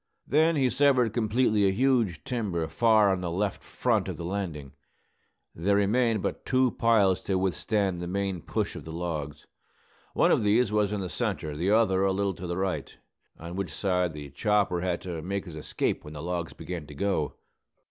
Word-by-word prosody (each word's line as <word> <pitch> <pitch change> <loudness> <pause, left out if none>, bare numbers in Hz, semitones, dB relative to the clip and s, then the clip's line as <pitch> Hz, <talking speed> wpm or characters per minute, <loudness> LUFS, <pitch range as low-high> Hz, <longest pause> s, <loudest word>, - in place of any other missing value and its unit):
Then 160 +5 +3
he 135 -3 +3
severed 130 -3 +3
completely 110 -2 +2
a - - +3
huge 115 - +1
timber 100 -10 -2
far 105 +5 +4
on 95 -1 -1
the 90 - -2
left 95 +3 -2
front - - 0
of - - -4
the 85 - -5
landing. 85 -7 -4 0.8
There 100 +5 +1
remained 110 +1 +2
but - - -3
two 130 -1 +2
piles 105 -5 +3
to 95 - -1
withstand 95 0 0
the 90 - -4
main 95 -1 -2
push - - -2
of - - -7
the 80 - -8
logs. 80 -4 -4 0.7
One - - +4
of - - +3
these 105 +2 +3
was 105 -1 +2
in 105 -1 -2
the 95 - -3
centre, 75 -2 -3
the 85 +6 -1
other 105 -3 +3
a 95 - +3
little 100 0 0
to 90 +1 -7
the 85 +1 -3
right, 95 -1 -3 0.4
on 85 +2 -8
which 95 -4 -3
side 90 0 0
the 75 -2 -8
chopper 100 +2 +1
had 90 -1 -1
to 85 -3 -5
make 100 +4 -3
his 85 -4 -9
escape 75 - -2
when 75 - -9
the 75 - -6
logs 85 -1 -3
began 85 -5 -6
to 75 - -11
go. 95 -3 -1
95 Hz, 195 wpm, -27 LUFS, 85-105 Hz, 0.8 s, far